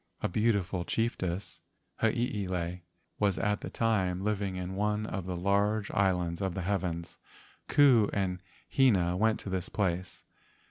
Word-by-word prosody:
A - - +1
beautiful 100 -3 +1
chiefess, 95 -4 -2 0.4
Hiilei, 100 -7 -1 0.4
was 100 -3 +2
at 105 -1 0
that - - -7
time 95 -5 +1
living 100 -2 -1
in 90 0 -4
one 105 +2 0
of 95 -3 -4
the 90 -1 -3
large 100 +3 +1
islands 90 -3 +1
of 95 -3 -1
the 95 - -3
heavens. 90 -3 -2 0.5
Ku 130 -7 +5
and 90 -3 -1 0.3
Hina 95 -10 +3
went 110 +3 +2
to 100 - -6
this 95 -1 -2
place. 95 -3 -2
95 Hz, 140 wpm, -30 LUFS, 90-105 Hz, 0.5 s, Ku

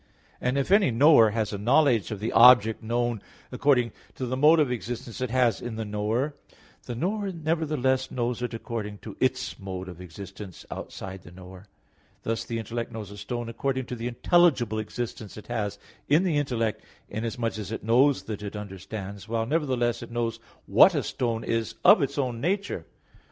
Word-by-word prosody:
And 125 +2 0
if 140 +6 -1
any 200 -1 +5
knower 120 -1 +6
has 110 -1 -2
a 100 - -3
knowledge 120 - +3
of 105 - -5
the 110 +3 -2
object 115 -3 +7
known 120 -1 -1 0.3
according 125 -2 +2 0.2
to 130 - -3
the 125 +1 -2
(mode 150 +5 +6
of) 145 -5 +2
existence 120 0 -5
it 130 - -1
has 120 -3 +2
in 120 -2 -5
the 110 0 -4
knower, 110 +7 -1 0.5
the 120 - -4
knower 195 - -1
nevertheless 150 -6 0
knows 120 -1 -2
it 125 -1 -3
according 110 -3 -5
to 105 - -7
its 130 0 -1
(mode 95 -2 -6
of) 90 -1 -9
existence 95 +2 -10
outside 95 0 -7
the - - -13
knower; 95 +2 -12 0.6
thus 115 0 -1
the 115 - -3
intellect 115 +1 -4
knows 105 -3 -7
a 100 - -10
stone 120 +3 -4
according 130 +3 -2
to 125 - -5
the 115 0 -4
intelligible 125 - +3
existence 110 -1 -5
it 105 - -10
has 110 -4 -3 0.3
in 155 +6 +5
the 175 -5 +1
intellect, 120 -6 -1 0.3
inasmuch 115 +1 -3
as 105 0 -6
it 115 - -5
knows 125 +5 +3
that 105 -2 -6
it 105 0 -6
understands; 100 0 -7
while 115 -1 0
nevertheless 130 -5 0
it - - -8
knows 115 -1 -2 0.3
what - - +6
a - - 0
stone 115 -2 -2
is 115 -4 -2
in - - +8
its - - -1
own 125 -4 -1
nature. 195 +5 -2
115 Hz, 185 wpm, -26 LUFS, 105-130 Hz, 0.6 s, in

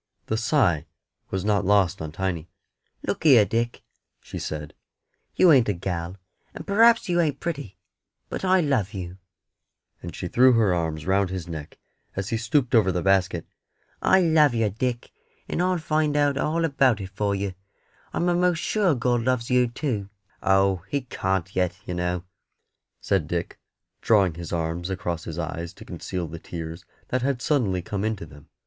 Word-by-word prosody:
The 110 - -1
sigh 110 - +2 0.4
was 95 0 -3
not 105 -1 +2
lost 100 -4 +2
on 80 -1 -5
Tiny. 85 -1 -3 0.6
"Look - - -2
here, 130 -9 +7
Dick," 115 +2 -2 0.4
she - - -8
said, 75 0 -5 0.6
"you 180 - +6
ain't 130 -7 +5
a - - +2
gal, 90 0 -4 0.4
and - - -7
p'r'aps 230 +3 +5
you 175 -1 +2
ain't 150 -4 0
pretty, 145 - -5 0.5
but - - -5
I 185 -1 +4
love 120 - 0
you;" 90 0 -6 0.8
and 85 - -7
she 90 - -4
threw 125 +7 +5
her 110 -5 +3
arms 80 -3 -2
round 95 0 +2
his 95 -2 -5
neck 80 -3 -7 0.4
as 95 +1 -3
he 115 - 0
stooped 120 +3 0
over 105 -5 +5
the 90 -1 -2
basket. 95 -3 +2 0.6
"I 190 - +5
love 155 -6 +4
yer, 115 -2 +2
Dick, 120 +4 -3 0.4
and - - -1
I'll 185 0 +2
find 155 -2 0
out 145 -1 +3
all 160 +4 0
about 135 -7 +3
it 95 -1 -6
for 100 0 -1
yer. 100 -1 -3 0.6
I'm 175 - 0
a'most 175 0 +2
sure 185 -2 +1
God 120 -1 +1
loves 125 0 0
yer 125 -1 +4
too." 115 -5 -3 0.3
"Oh, 95 0 +3
He 140 - 0
can't 95 -6 -2
yet, 90 0 0
yer 90 - -4
know," 90 0 -2 0.8
said 95 -6 0
Dick, 85 +1 -3 0.4
drawing 100 -6 +3
his 85 0 -8
arms 85 +1 -2
across 90 -3 -3
his 80 - -6
eyes 85 0 -4
to - - -13
conceal 90 -3 -5
the 80 +1 -8
tears 85 +1 -7 0.2
that 130 - 0
had 135 -1 0
suddenly 110 - 0
come 100 +1 -3
into 110 -5 -2
them. 75 -2 -15
100 Hz, 175 wpm, -25 LUFS, 90-130 Hz, 0.8 s, here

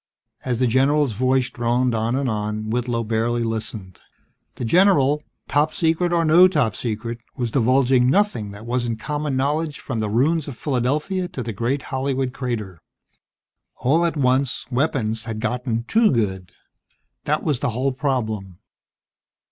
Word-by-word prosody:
As 125 -2 -1
the 130 - +2
general's 135 +3 +3
voice 130 +3 +1
droned 120 +1 0
on 115 +2 0
and 135 0 0
on, 105 -1 -2
Whitlow 120 0 -1
barely 115 +2 0
listened. 110 -4 -5 0.6
The 125 - -4
general, 150 - +4 0.3
Top 150 +2 +1
Secret 170 0 +1
or 170 -1 +2
no 170 +4 +7
Top 140 - 0
Secret, 115 +1 -4 0.2
was 120 -3 -2
divulging 130 0 +3
nothing 185 - +1
that 100 +2 -10
wasn't 120 -2 -2
common 145 +1 -2
knowledge 150 +3 -1
from 115 -5 -4
the 105 -1 -1
ruins 145 +8 +1
of 135 -5 -7
Philadelphia 150 +8 -1
to 130 - -6
the 115 -1 -4
great 120 +7 -1
Hollywood 130 -1 -1
crater... 110 - -4 0.9
All 155 +7 +2
at 170 -2 0
once, 130 -2 +1
weapons 120 -5 0
had 110 -2 -4
gotten 120 0 -2
too 220 - +3
good. 95 - -1 0.7
That - - 0
was 145 -5 0
the - - 0
whole 130 +4 0
problem. 110 - -2
125 Hz, 150 wpm, -22 LUFS, 115-145 Hz, 0.9 s, no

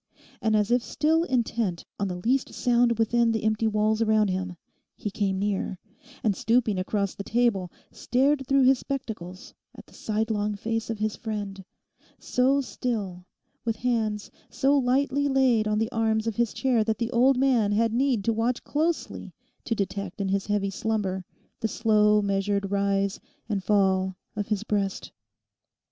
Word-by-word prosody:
And 220 -1 +2
as 210 +1 +1
if 245 0 +4
still 320 +6 +1
intent 230 - -1
on 200 - 0
the 180 - -3
least 245 +9 0
sound 240 -1 +2
within 230 +1 +2
the 220 -1 -1
empty 220 +1 +1
walls 215 +1 +1
around 215 -2 +3
him, 185 -1 -3 0.4
he 210 - -4
came 195 -1 -1
near, 195 -1 -1 0.5
and 210 -3 +2
stooping 225 -2 +1
across 200 +1 -1
the 200 - -7
table, 210 -6 +1 0.2
stared 270 +2 +1
through 275 -1 +4
his 260 0 +5
spectacles 210 -10 -6 0.2
at - - -12
the - - -21
sidelong 210 -1 -1
face 225 +2 -3
of 225 - -2
his 215 0 -1
friend, 205 -3 -5 0.5
so 265 +3 +2
still, 200 -9 -4 0.4
with 225 -1 -1
hands 220 -3 -1 0.2
so 280 +1 +2
lightly 275 +2 +2
laid 260 -5 +3
on 210 0 +1
the 225 +2 0
arms 220 -2 +1
of 225 -2 -2
his 235 -2 +1
chair 250 -5 +1
that 220 0 -1
the 235 0 -2
old 250 +2 +4
man 250 -6 +3
had 225 +2 +2
need 250 -3 +1
to 230 - +1
watch 230 +3 -1
closely 320 +3 -2 0.3
to 230 - 0
detect 200 -1 -4
in 195 -1 -1
his 195 0 -1
heavy 205 -1 0
slumber 195 -3 -2 0.4
the 220 - 0
slow 210 -2 +3
measured 200 0 0
rise 200 0 0 0.3
and 200 -4 -2
fall 190 -2 +2 0.2
of 205 - -3
his 210 -1 -1
breast. 200 -3 -2
220 Hz, 165 wpm, -26 LUFS, 200-240 Hz, 0.5 s, his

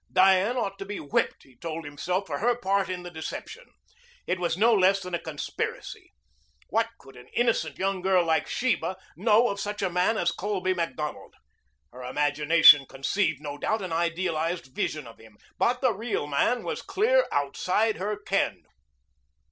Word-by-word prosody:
Diane 190 +6 +4
ought 200 -4 -2
to 195 - -5
be 205 0 -5
whipped, 140 - -1
he 130 - -21
told 165 +4 -6
himself, 180 +7 -2
for - - -4
her 240 +3 +2
part 195 -4 0
in 180 -1 -4
the 175 - -8
deception. 440 - -7 0.6
It 185 - -1
was 175 -1 -1
no 230 +4 +5
less 195 -1 +4
than 180 -2 -8
a 170 - 0
conspiracy. 160 -3 -5 0.6
What 225 +2 +1
could 135 -1 -16
an 125 0 -14
innocent 225 -11 +1
young 195 -1 -1
girl 185 -2 +3
like 160 -2 +1
Sheba 240 -6 -1 0.2
know 220 +5 +4
of 200 - -4
such 205 0 -4
a 185 - 0
man 180 +5 +2
as 170 - +1
Colby 185 0 -1
Macdonald? 165 -4 -4 0.6
Her 125 - -10
imagination 145 +2 +5
conceived, 160 +2 -1
no 145 -1 -6
doubt, 220 -1 -1
an 180 -3 -4
idealized 170 -3 -1
vision 155 0 -2
of 115 - -13
him. 110 -2 -17 0.2
But 245 +1 +2
the 255 -4 +3
real 220 -5 -3
man 150 - +1
was - - -4
clear - - +2
outside 185 +10 0
her 205 +2 -2
ken. 205 - -1
185 Hz, 170 wpm, -27 LUFS, 155-210 Hz, 0.6 s, no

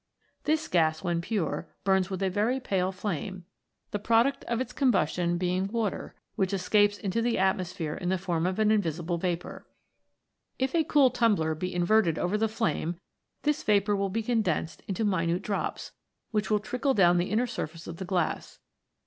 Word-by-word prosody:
This 310 +1 +1
gas 160 -2 +2
when 175 -2 0
pure 195 -2 -2
burns 190 -1 +2
with 190 0 -3
a 190 - +2
very 220 +7 +1
pale 190 -7 0
flame, 185 -1 -4 0.5
the 205 - -2
pro 225 +2 +4
duct 275 +1 -2
of 235 -1 -1
its 255 - -4
combustion 175 - +1
being 180 +2 0
water, 220 -1 -3 0.2
which 190 0 0
escapes 205 +2 +3
into 205 +2 -1
the 235 0 +1
atmosphere 185 -4 0
in 180 - -3
the 190 - +2
form 175 -2 -1
of 185 - -2
an 215 -1 +3
invisible 170 -4 0
vapour. 175 0 -3 0.9
If 265 0 -1
a 330 -2 +3
cool 280 -4 +4
tumbler 210 -10 +2
be 180 +4 -4
inverted 175 -1 +2
over 180 +3 0
the 220 +1 +2
flame 175 -6 -1 0.4
this 300 -1 +1
vapour 205 0 +2
will 195 0 0
be 225 +4 -2
condensed 215 -8 -1
into 205 +3 -1
minute 175 -3 0
drops, 205 - -3 0.4
which 210 -2 0
will 215 - +4
trickle 250 +6 -1
down 175 -3 +5
the 175 - -1
inner 220 +5 +2
surface 165 -8 -5
of 170 - -7
the 190 - -5
glass. 180 -3 -2
195 Hz, 180 wpm, -28 LUFS, 175-220 Hz, 0.9 s, down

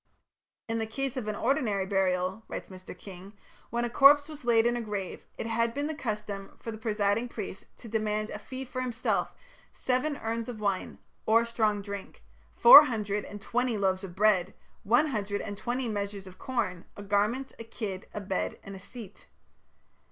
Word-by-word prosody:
"In 225 0 -1
the 220 - -2
case 270 +3 -3
of 250 -5 -4
an 210 - -2
ordinary 225 -6 +1
burial," 190 +1 0
writes - - -6
Mr. 185 -1 -10
King, 190 +1 -11 0.4
"when 235 +1 -1
a - - -2
corpse 285 +2 +7
was 305 -3 -9
laid 230 -1 +4
in 240 0 +2
a 240 - -2
grave, 205 -4 -5
it - - -4
had 230 0 0
been 285 +1 -1
the 315 - -2
custom 210 -7 -5
for 230 - -5
the 220 - -7
presiding 215 +1 0
priest 205 -4 -6
to 235 - -12
demand 215 -1 -1
as - - -4
a - - -13
fee 260 +4 -7
for 255 0 -4
himself 250 -1 -1 0.4
seven 270 +3 -1
urns 230 0 -3
of 230 -3 -6
wine 200 -3 -1 0.3
or 230 +1 +5
strong 215 -3 0
drink, 200 - -8 0.3
four 285 +5 +11
hundred 210 -5 -2
and 205 0 -9
twenty 245 0 0
loaves 190 -1 +1
of 180 -3 -8
bread, 200 -3 +3 0.3
one 240 +9 +4
hundred 205 -7 -2
and 205 - -5
twenty 245 +4 -2
measures 200 -2 -3
of 185 -1 -13
corn, 185 -9 -2
a 205 - -7
garment, 210 +7 0
a - - -5
kid, 210 -4 -6
a - - -5
bed, 190 -1 -2
and 195 0 -8
a - - -9
seat." 210 0 -11
215 Hz, 190 wpm, -29 LUFS, 200-240 Hz, 0.4 s, four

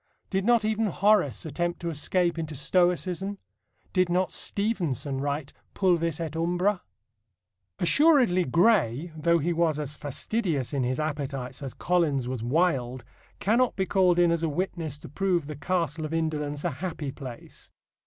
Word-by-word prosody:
Did 190 -1 0
not 235 -2 +4
even 220 0 +1
Horace 195 - +2
attempt 175 +3 -2
to 170 -1 -2
escape 170 +2 0
into 155 -2 -4
Stoicism? 180 +4 +1 0.6
Did 185 -2 +2
not 180 +1 +1
Stevenson 165 - -1
write 145 0 -3 0.2
Pulvis 170 -4 +1
et 160 -2 -4
Umbra? 180 +4 +1 1.0
Assuredly 250 - +4
Gray, 170 - +2
though 170 +2 +2
he 170 +2 0
was 165 -2 +1
as 150 0 -3
fastidious 150 - -2
in 140 - 0
his 125 +3 -1
appetites 140 -4 -4
as 135 -3 -6
Collins 155 -8 +1
was 125 -2 -3
wild, 130 -2 0 0.4
cannot 235 +5 +2
be 190 - 0
called 185 -2 +3
in 175 -1 +4
as 170 -1 +1
a 165 - 0
witness 160 -2 -3
to - - -11
prove 180 -2 0
the 150 +1 -6
Castle 160 +1 -1
of 155 +1 -3
Indolence 150 -2 -2
a 175 - 0
happy 150 -1 -4
place. 130 -4 -9
165 Hz, 155 wpm, -27 LUFS, 145-185 Hz, 1.0 s, not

